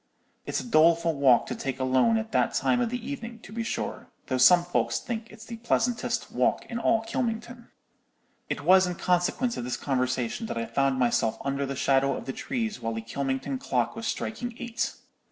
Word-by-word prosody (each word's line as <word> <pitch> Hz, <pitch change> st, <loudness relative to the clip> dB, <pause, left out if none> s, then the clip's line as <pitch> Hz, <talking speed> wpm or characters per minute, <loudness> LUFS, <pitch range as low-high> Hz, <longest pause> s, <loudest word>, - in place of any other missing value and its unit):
It's -, -, -1 dB
a -, -, -6 dB
doleful 165 Hz, -5 st, +4 dB
walk 135 Hz, -5 st, +4 dB
to -, -, -4 dB
take 135 Hz, -1 st, -4 dB
alone 130 Hz, -, +3 dB
at 220 Hz, 0 st, -4 dB
that -, -, +1 dB
time 245 Hz, -, +2 dB
of 240 Hz, -, +1 dB
the 245 Hz, 0 st, -5 dB
evening, 240 Hz, -5 st, -6 dB
to 210 Hz, -, -12 dB
be 230 Hz, -, -2 dB
sure, 230 Hz, -, -4 dB, 0.2 s
though 130 Hz, -1 st, -1 dB
some 175 Hz, +7 st, +7 dB
folks 175 Hz, -, 0 dB
think 230 Hz, -1 st, -5 dB
it's 220 Hz, 0 st, -12 dB
the 230 Hz, -1 st, -7 dB
pleasantest 235 Hz, +1 st, -1 dB
walk -, -, +1 dB
in 235 Hz, -, -4 dB
all 225 Hz, -1 st, +2 dB
Kylmington.' 235 Hz, +1 st, -3 dB, 0.8 s
"It -, -, -2 dB
was 185 Hz, +4 st, +5 dB
in 180 Hz, -, -3 dB
consequence 180 Hz, +9 st, 0 dB
of -, -, -3 dB
this 125 Hz, +1 st, -3 dB
conversation 130 Hz, -, -1 dB
that -, -, -4 dB
I 115 Hz, -, -1 dB
found 135 Hz, +1 st, +1 dB
myself 115 Hz, -3 st, +1 dB
under 140 Hz, 0 st, -1 dB
the 140 Hz, -, -4 dB
shadow 135 Hz, 0 st, +2 dB
of -, -, -8 dB
the 130 Hz, -, -4 dB
trees 225 Hz, -, -3 dB
while 115 Hz, 0 st, -2 dB
the 115 Hz, -, -3 dB
Kylmington 135 Hz, -, -3 dB
clock 265 Hz, -, -1 dB
was 225 Hz, 0 st, -4 dB
striking 240 Hz, +2 st, -3 dB
eight. 235 Hz, -2 st, -3 dB
180 Hz, 200 wpm, -27 LUFS, -, 0.8 s, some